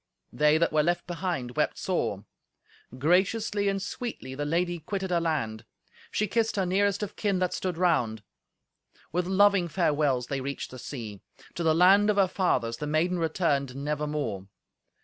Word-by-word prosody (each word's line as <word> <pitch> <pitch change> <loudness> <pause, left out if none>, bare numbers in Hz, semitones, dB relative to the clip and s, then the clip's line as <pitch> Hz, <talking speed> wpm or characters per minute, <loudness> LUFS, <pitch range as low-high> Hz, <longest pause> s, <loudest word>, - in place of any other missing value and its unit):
They 150 +5 +4
that 170 0 +1
were 155 - +4
left 175 +3 0
behind 170 -9 -3
wept - - 0
sore! - - -2 0.7
Graciously 200 - +1
and 195 0 -1
sweetly 200 - -5
the 145 +2 -3
lady 175 +3 0
quitted 190 +3 -4
her 170 -1 +2
land. 135 -10 -2 0.5
She 210 - 0
kissed 225 +2 0
her 195 -2 +1
nearest 200 +2 +1
of 205 - -6
kin 200 -3 0
that 180 -1 0
stood 180 -3 -3
round. 120 - +1 0.9
With 175 +3 -1
loving 195 -1 +4
farewells 150 -7 +1
they 135 +1 -3
reached 140 +1 -5
the 130 - -9
sea. 110 -7 -7 0.3
To - - -5
the 160 -2 +3
land 195 +4 +6
of 210 - +3
her 195 -2 +5
fathers 175 - 0
the 150 - -4
maiden 170 +4 +1
returned 150 -5 0
nevermore. 145 -8 -3
170 Hz, 165 wpm, -27 LUFS, 140-190 Hz, 0.9 s, land